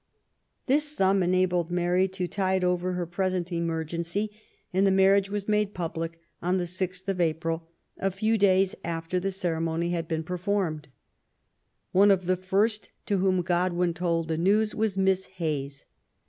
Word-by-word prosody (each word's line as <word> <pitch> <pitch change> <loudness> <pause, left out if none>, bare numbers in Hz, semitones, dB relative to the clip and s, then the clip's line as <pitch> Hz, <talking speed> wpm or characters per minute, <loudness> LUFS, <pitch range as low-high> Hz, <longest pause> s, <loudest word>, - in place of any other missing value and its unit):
This 295 +3 +2
sum 195 0 +3
enabled 180 -1 +1
Mary 175 +1 +2
to 185 -1 -3
tide 190 0 0
ofer 180 0 0
her 180 -1 -2
present 185 0 -2
emergency, 170 +4 -2 0.4
and 195 +2 +3
the - - +5
marriage 195 +1 +4
was 205 -1 -3
made 210 -1 +1
public 165 -1 -4 0.2
on 180 +2 +1
the 180 - 0
6th 185 +1 -3
of 190 -2 0
April, 165 0 -1 0.3
a 195 - +1
few 215 +4 0
days 195 -2 +3
after 165 +2 -2
the 195 +2 -2
cere* 175 -4 -1
mony 165 +1 -1
had 165 -2 -2
been 160 -1 -2
performed. 180 -3 -2 1.0
One 200 +2 +5
of 190 -2 +3
the 185 +1 +2
first 200 +4 0 0.2
to 200 - +1
whom 185 -1 +2
Godwin 175 0 +1
told 165 -1 -1
the 160 0 -1
news 210 +4 +2
was 215 -3 -1
Miss 190 0 +2
Hayes. 145 -4 -3
180 Hz, 160 wpm, -27 LUFS, 170-195 Hz, 1.0 s, the